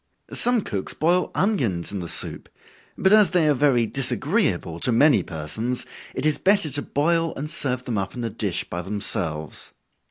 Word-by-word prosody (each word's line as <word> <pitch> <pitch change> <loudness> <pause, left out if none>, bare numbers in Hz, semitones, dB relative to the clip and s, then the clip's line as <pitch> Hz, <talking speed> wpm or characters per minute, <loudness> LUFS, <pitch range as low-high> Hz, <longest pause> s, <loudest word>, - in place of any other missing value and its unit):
Some 245 -2 +3
cooks 100 - -4
boil 175 +4 +1
onions 125 - 0
in 100 - -4
the 85 - -5
soup, - - -2 0.5
but 190 +1 +3
as 215 -2 +6
they 175 -3 +2
are 150 - +4
very 130 -4 +2
disagreeable 135 - 0
to 125 - +1
many 140 +5 +4
persons, 105 +10 -3 0.3
it - - -2
is 155 -1 +2
better 195 -6 +3
to 145 +2 0
boil 165 +4 0
and 145 - -4
serve 130 -4 0
them 115 -5 -2
up 95 0 -4
in 120 - -5
a 115 - -3
dish - - -1
by 85 - -5
themselves. 85 -5 -3
130 Hz, 180 wpm, -23 LUFS, 100-165 Hz, 0.5 s, as